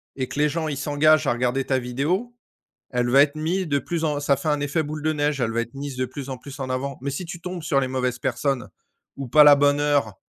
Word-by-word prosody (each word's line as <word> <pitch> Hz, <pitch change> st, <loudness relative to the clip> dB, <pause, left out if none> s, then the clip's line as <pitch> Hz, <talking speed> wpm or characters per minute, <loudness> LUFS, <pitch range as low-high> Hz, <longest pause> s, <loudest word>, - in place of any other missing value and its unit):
et 130 Hz, -1 st, -3 dB
que 145 Hz, -, -6 dB
les 150 Hz, 0 st, +3 dB
gens, 160 Hz, +1 st, -2 dB
ils 145 Hz, -2 st, -3 dB
s'engagent 145 Hz, +1 st, +3 dB
à -, -, +3 dB
regarder 125 Hz, +2 st, -1 dB
ta 130 Hz, -1 st, +1 dB
vidéo, 155 Hz, -, -2 dB, 0.6 s
elle 125 Hz, -1 st, 0 dB
va 135 Hz, +3 st, +6 dB
être 145 Hz, +1 st, 0 dB
mise 170 Hz, +4 st, -1 dB
de 140 Hz, -1 st, +2 dB
plus 165 Hz, +3 st, -3 dB
en 150 Hz, -2 st, 0 dB
ça 140 Hz, -1 st, +2 dB
fait 140 Hz, +4 st, -4 dB
un 150 Hz, -1 st, +1 dB
effet 145 Hz, +3 st, 0 dB
boule 150 Hz, 0 st, -6 dB
de 155 Hz, +1 st, +1 dB
neige, 145 Hz, -1 st, -1 dB
elle 115 Hz, -2 st, 0 dB
va 115 Hz, -, 0 dB
être 115 Hz, +2 st, -6 dB
mise 140 Hz, -1 st, -6 dB
de 130 Hz, 0 st, -1 dB
plus 140 Hz, +1 st, -8 dB
en 130 Hz, -, -4 dB
plus 140 Hz, +2 st, -11 dB
en 130 Hz, -1 st, -4 dB
avant 135 Hz, +1 st, -3 dB
mais 140 Hz, -, -2 dB
si 140 Hz, +7 st, -4 dB
tu 175 Hz, 0 st, -7 dB
tombes 180 Hz, -1 st, -6 dB
sur 155 Hz, -3 st, +1 dB
les 130 Hz, -, -1 dB
mauvaises 125 Hz, -1 st, -2 dB
personnes 130 Hz, -1 st, -1 dB, 0.5 s
ou 135 Hz, -2 st, -6 dB
pas 150 Hz, +5 st, +7 dB
la 145 Hz, -, +9 dB
bonne 145 Hz, 0 st, +3 dB
heure 145 Hz, -8 st, +1 dB
140 Hz, 275 wpm, -23 LUFS, 130-155 Hz, 0.6 s, la